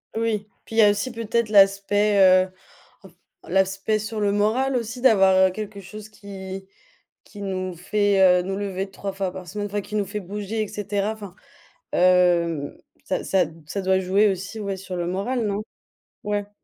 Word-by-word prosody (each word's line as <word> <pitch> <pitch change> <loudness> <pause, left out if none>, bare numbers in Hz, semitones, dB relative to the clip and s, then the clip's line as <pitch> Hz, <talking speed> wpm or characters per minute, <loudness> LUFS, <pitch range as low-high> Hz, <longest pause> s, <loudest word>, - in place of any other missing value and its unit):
Oui. 220 -2 -1 0.2
Puis 225 - -9
il 225 - +2
y - - +9
a 210 - +7
aussi 210 +5 -2
peut-être 230 -1 -1
l'aspect, 200 +1 +4
heu, 185 -1 +6 0.6
f 180 - -20 0.4
l'aspect 195 +3 +1
sur 215 +1 -5
le 205 -1 +1
moral 225 +6 +1
aussi 235 0 -3
d'avoir, 190 -6 +5
heu, - - -3
quelque 210 +1 -7
chose 210 +3 -10
qui 195 -2 -9 0.6
qui 205 - -12
nous 185 -2 -3
fait, 200 +3 +1 0.2
heu, - - 0
nous 195 +2 -3
lever 195 -1 -3
3 195 0 -6
fois 190 -1 -2
par 185 -1 -9
semaine 205 +3 -4
enfin 205 0 -3
qui 210 - -8
nous 205 -2 +1
fait 210 +2 -5
bouger 210 +3 -4
et 215 - -5
cetera 205 +1 -2
enfin, 200 -4 -10 0.6
hem, 175 -4 +3 0.3
ça 185 - -2
ça 190 -2 +2
d 160 +1 -12
ça 200 +3 -3
doit 190 0 +2
jouer 195 +3 +3
aussi, 195 +4 -4
ouais, 200 -2 -3
sur 185 -1 -7
le 175 -1 -2
moral, 220 +7 -1
non? 200 +1 -2 0.6
Ouais. 205 0 -2
200 Hz, 190 wpm, -23 LUFS, 190-210 Hz, 0.6 s, y